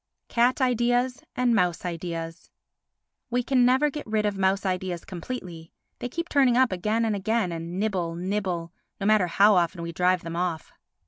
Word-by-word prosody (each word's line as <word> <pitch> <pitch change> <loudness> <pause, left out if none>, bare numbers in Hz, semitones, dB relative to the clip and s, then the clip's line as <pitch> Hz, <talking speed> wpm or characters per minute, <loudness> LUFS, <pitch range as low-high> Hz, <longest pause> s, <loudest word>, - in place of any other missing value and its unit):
Cat 245 +3 +2
Ideas 245 +1 +1
and 250 -1 +2
Mouse 180 -5 +1
Ideas 165 -1 -5 0.8
We 245 0 0
can 250 0 +3
never 265 +4 +3
get 295 -2 -7
rid 215 -1 0
of 205 -1 0
mouse 195 +1 +1
ideas 185 -2 -2
completely, 175 -4 -7 0.3
they 245 - -4
keep 335 +6 -4
turning 265 -6 +3
up 260 -3 +4
again 215 +5 0
and 220 -2 0
again, 215 -1 0
and 170 +2 -5
nibble, 185 -6 -1
nibble—no 185 0 -4
matter 210 -3 +4
how 200 +5 +5
often 175 -1 +1
we 170 - -4
drive 180 +1 +1
them 165 0 -5
off. 170 -3 -3
195 Hz, 170 wpm, -26 LUFS, 175-240 Hz, 0.8 s, how